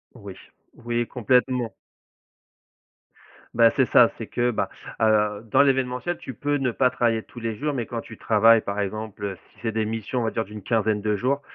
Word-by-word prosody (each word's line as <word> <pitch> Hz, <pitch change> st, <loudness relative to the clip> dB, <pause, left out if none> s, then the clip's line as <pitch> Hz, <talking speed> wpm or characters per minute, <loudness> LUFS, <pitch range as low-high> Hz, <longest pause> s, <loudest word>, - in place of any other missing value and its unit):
Oui, 100 Hz, -5 st, -10 dB, 0.5 s
oui, 120 Hz, 0 st, 0 dB
complètement. 125 Hz, 0 st, +1 dB, 1.8 s
Bah, 115 Hz, 0 st, +5 dB
c'est 130 Hz, -, +4 dB
ça, 120 Hz, -1 st, +6 dB
c'est 115 Hz, -, -6 dB
que, 120 Hz, 0 st, 0 dB
ben, 110 Hz, -, -1 dB, 0.3 s
heu, 105 Hz, -1 st, +2 dB
dans 130 Hz, -, +6 dB
l'événementiel, 130 Hz, +4 st, 0 dB
tu 130 Hz, -, -8 dB
peux 145 Hz, +5 st, -1 dB
ne 130 Hz, -3 st, 0 dB
pas 125 Hz, +2 st, +2 dB
travailler 115 Hz, -2 st, 0 dB
tous 120 Hz, -, -12 dB
les 115 Hz, -2 st, -3 dB
jours, 150 Hz, +4 st, -2 dB
mais 120 Hz, -4 st, -2 dB
quand 115 Hz, +1 st, -5 dB
tu 110 Hz, -, -12 dB
travailles, 115 Hz, +1 st, +5 dB
par 100 Hz, +1 st, -4 dB
exemple, 105 Hz, +1 st, -4 dB
heu, 95 Hz, -2 st, -3 dB, 0.2 s
si 110 Hz, -, -23 dB
c'est 115 Hz, -, -1 dB
des 110 Hz, 0 st, -1 dB
missions, 115 Hz, +3 st, -3 dB
on -, -, -1 dB
va 110 Hz, -, -1 dB
dire, 115 Hz, -, -2 dB
d'une 105 Hz, 0 st, -10 dB
quinzaine 110 Hz, -1 st, +1 dB
de 105 Hz, 0 st, 0 dB
jours, 130 Hz, +7 st, 0 dB
115 Hz, 195 wpm, -24 LUFS, 110-125 Hz, 1.8 s, ça